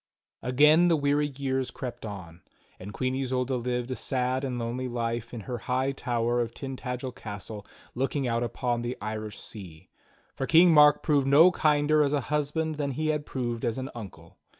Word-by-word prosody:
Again 150 +7 +5
the 170 - +4
weary 145 0 +1
years 135 -2 -2
crept 120 -4 -6
on, 90 -4 -9 0.4
and 95 +3 -8
Queen 130 +3 -2
Isolda 130 -1 -1
lived 125 0 -2
a - - -1
sad 130 +1 -1
and 130 -2 -2
lonely 120 +2 -3
life 115 -1 -3
in 120 - -6
her 120 +3 -5
high 130 +3 0
tower 120 -2 -1
of 115 0 -4
Tintagel 130 -1 -5
castle 105 -2 -8 0.3
looking 135 +1 -1
out 115 0 0
upon 120 0 -1
the 120 +1 -4
Irish 110 0 -5
Sea; 90 -7 -11 0.4
for 135 - -3
King 170 +1 +6
Mark 150 -1 +6
proved 145 -4 +2
no 155 +6 +7
kinder 150 -2 +3
as 145 -1 +2
a 145 - +1
husband 150 +2 -1
than 140 -1 -1
he 155 +4 -1
had 150 -1 -1
proved 120 -3 -3
as 115 -1 -1
an 130 0 -5
uncle. 90 -8 -11
125 Hz, 180 wpm, -27 LUFS, 120-140 Hz, 0.4 s, no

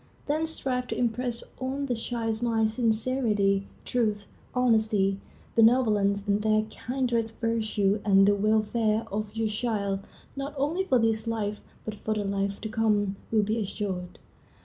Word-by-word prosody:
Then 310 +2 0
strive 255 -5 -2
to - - -3
impress 240 0 -1 0.2
on 265 +2 -2
the 255 - 0
child's 225 -1 -2
mind 225 -2 +2
sincerity, 220 -4 +1 0.2
truth, 215 -4 0 0.3
honesty, 220 -5 +2 0.4
benevolence, 215 -4 +4
and 205 +1 +2
their 215 0 +3
kindred 240 -3 -1
virtues, 215 -3 +1
and 195 -1 +5
the 205 - +5
welfare 215 +1 +1
of 210 +1 -3
your 225 0 0
child, 210 -3 -1 0.4
not 275 +1 -5
only 320 +8 0
for 260 - +3
this 225 -1 +1
life, 210 -2 -2 0.3
but 215 - -3
for 215 +1 -3
the 210 -1 -1
life 200 0 -1
to 220 - -3
come, 210 -3 +1 0.2
will 220 -2 +3
be 215 +3 0
assured. 190 -3 -4
220 Hz, 150 wpm, -27 LUFS, 205-240 Hz, 0.4 s, and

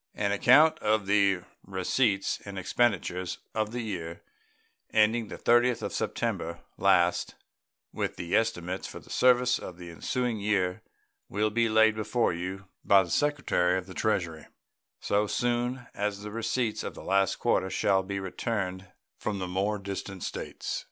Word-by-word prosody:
An 100 -1 0
account 150 +10 +5
of 105 -1 +1
the 100 -2 +3 0.2
receipts 95 +2 0
and 100 -1 -8
expenditures 95 -2 0 0.2
of 110 -1 -1
the 120 +1 -3
year 85 -7 -5 0.7
ending 110 +1 +3
the - - -7
30th 120 0 +3
of - - -3
September 85 +1 -2
last, 85 0 +2 0.6
with - - -2
the 85 0 -2
estimates 95 -5 -1
for - - -9
the - - -13
service 125 0 +4
of 90 - -8
the 90 -1 -9
ensuing 120 +6 -2
year, 100 -3 0 0.5
will 105 +1 0
be 115 +1 +2
laid 110 0 +5
before 110 0 0
you 95 +3 -5 0.2
by 100 -1 +6
the 85 - -8
Secretary 140 -12 +2
of 95 - -4
the 95 - -10
Treasury 85 -7 -1 0.5
so 105 +1 +1
soon 120 +2 -1
as 100 0 -2
the 105 - -6
receipts 115 0 -1
of - - -5
the - - -9
last 95 -1 +2
quarter 95 - +1
shall 95 0 +2
be 100 +1 -4
returned 95 -1 -3 0.3
from 105 -2 -2
the 95 -1 -3
more 100 +4 0
distant 100 -1 -6
States. - - -4
100 Hz, 155 wpm, -28 LUFS, 95-115 Hz, 0.7 s, by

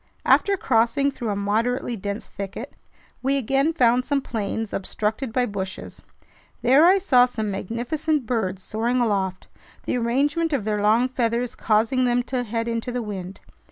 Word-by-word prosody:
After 400 -1 +4
crossing 260 +2 +2
through 240 -4 -5
a 205 - -1
moderately 230 +5 0
dense 200 0 -5
thicket, 200 +7 -7 0.5
we 275 +2 +1
again 270 +4 +1
found 250 -6 +3
some 285 +1 0
plains 225 -3 -4
obstructed 220 +5 -2
by 250 +2 +1
bushes. 195 -3 -6 0.6
There 275 +7 +6
I 380 +2 +6
saw 255 -10 +4
some 220 -4 -3
magnificent 245 - -2
birds 195 -6 -2
soaring 235 +3 -1
aloft, 195 -5 -1 0.4
the - - 0
arrangement 290 +7 +1
of 245 -8 -1
their 210 -1 0
long 220 +4 +4
feathers 240 -1 -1
causing 225 +4 +1
them 245 0 +2
to 255 0 -2
head 230 0 -3
into 230 +1 -2
the 245 -1 -2
wind. 195 -3 -7
235 Hz, 160 wpm, -23 LUFS, 215-260 Hz, 0.6 s, There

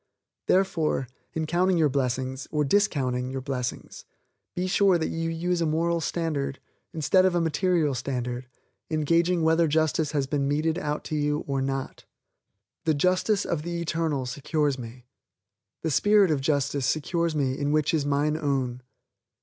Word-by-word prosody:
Therefore, 170 -8 +1 0.3
in 160 -1 -1
counting 180 +3 +2
your 160 -2 +4
blessings, 130 -1 -2
or 150 -1 0
discounting 135 -8 +1
your 135 0 -3
blessings, 130 -2 -5 0.5
be 180 - -1
sure 190 0 +4
that 160 - -2
you 165 0 -2
use 170 +1 -1
a 165 - +2
moral 165 +2 +1
standard, 145 -5 -2 0.3
instead 180 +2 +3
of 185 -1 +2
a - - +3
material 165 -2 +1
standard, 125 0 -3 0.4
in 155 -1 0
gauging 170 +2 +2
whether 160 +1 +4
justice 155 0 +1
has 140 -2 +1
been 140 0 -1
meted 155 +4 0
out 150 -3 -3
to 155 - -4
you 150 0 0
or 135 -1 -1
not. 135 0 -4 0.8
The 160 -2 +2
Justice 185 +6 +2
of 165 -3 -1
the 170 +1 -4
Eternal 160 -5 -1
secures 145 +2 -1
me, 120 +1 -9 0.8
the 160 - 0
Spirit 205 +2 +4
of 145 -3 +1
Justice 140 -2 0
secures 165 +1 0
me 135 -3 0
in 145 +1 -1
which 155 +2 +2
is 155 -3 +2
mine 145 +2 +1
own. 135 -5 -1
155 Hz, 160 wpm, -26 LUFS, 135-170 Hz, 0.8 s, your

